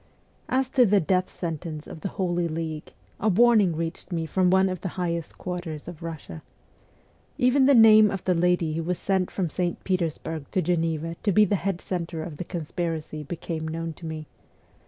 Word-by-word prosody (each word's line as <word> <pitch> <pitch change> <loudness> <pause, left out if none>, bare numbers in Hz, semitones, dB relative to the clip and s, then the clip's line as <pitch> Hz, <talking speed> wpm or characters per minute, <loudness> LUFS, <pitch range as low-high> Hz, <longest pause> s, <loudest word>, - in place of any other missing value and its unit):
As 260 0 +1
to 255 - +5
the 205 -3 +4
death 185 +2 +1
sentence 160 -2 -5
of 160 - -10
the - - -2
Holy 175 -2 0
League, 160 -1 -5 0.3
a 215 - +2
warning 215 -4 +5
reached 165 +3 -5
me 165 -2 -1
from 180 +3 +2
one 190 +1 +4
of 185 -1 -4
the - - -3
highest 170 -2 -3
quarters 175 -4 -5
of 175 -2 -9
Russia. 160 - -7 1.0
Even 260 +2 +4
the 280 - +6
name 215 -2 +8
of 195 -2 -4
the 185 - +2
lady 175 -2 +2
who 165 - -1
was 175 +2 -2
sent 190 -2 0
from 185 -3 -1
St. 175 0 -2
Petersburg 165 -4 -2
to 190 - +2
Geneva 165 -1 -1
to 205 - +1
be 210 +3 +6
the 205 - +1
head 190 -1 -2
centre 170 -3 -4
of 160 -3 -7
the - - -4
conspiracy 165 -2 -4
became 160 +1 -5
known 165 +1 -4
to 165 +1 -9
me. 155 -1 -5
175 Hz, 190 wpm, -26 LUFS, 160-190 Hz, 1.0 s, name